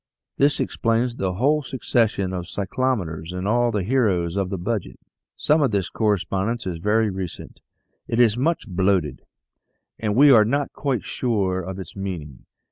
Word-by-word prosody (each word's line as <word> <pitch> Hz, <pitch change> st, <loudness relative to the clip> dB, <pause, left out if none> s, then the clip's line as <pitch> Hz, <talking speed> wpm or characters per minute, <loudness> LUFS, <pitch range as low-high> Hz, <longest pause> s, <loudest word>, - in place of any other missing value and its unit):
This 145 Hz, +1 st, +3 dB
explains 115 Hz, +2 st, 0 dB
the 95 Hz, -1 st, -1 dB
whole 145 Hz, +8 st, +2 dB
succession 115 Hz, -7 st, 0 dB
of 90 Hz, -1 st, -4 dB
cyclometers 95 Hz, -7 st, -2 dB
and 90 Hz, +2 st, -4 dB
all 120 Hz, +2 st, +2 dB
the 105 Hz, -4 st, -1 dB
heroes 95 Hz, -7 st, +1 dB
of 100 Hz, -2 st, -1 dB
the 95 Hz, -, -3 dB
Budget. 90 Hz, -, -3 dB, 0.4 s
Some 155 Hz, +1 st, +2 dB
of 140 Hz, -, +3 dB
this 100 Hz, -4 st, -1 dB
correspondence 105 Hz, +1 st, -1 dB
is 90 Hz, -3 st, -4 dB
very 105 Hz, +3 st, +2 dB
recent; 95 Hz, -2 st, -7 dB, 0.5 s
it 115 Hz, -, -1 dB
is 115 Hz, -3 st, +5 dB
much 155 Hz, +3 st, 0 dB
blotted, 95 Hz, -4 st, 0 dB, 0.8 s
and 105 Hz, -2 st, -1 dB
we 140 Hz, +3 st, +7 dB
are 110 Hz, -4 st, +7 dB
not 140 Hz, +6 st, -1 dB
quite 135 Hz, -7 st, -2 dB
sure 100 Hz, -7 st, -1 dB
of 95 Hz, +1 st, -6 dB
its 95 Hz, -, -9 dB
meaning. 85 Hz, -9 st, -6 dB
105 Hz, 160 wpm, -23 LUFS, 95-120 Hz, 0.8 s, we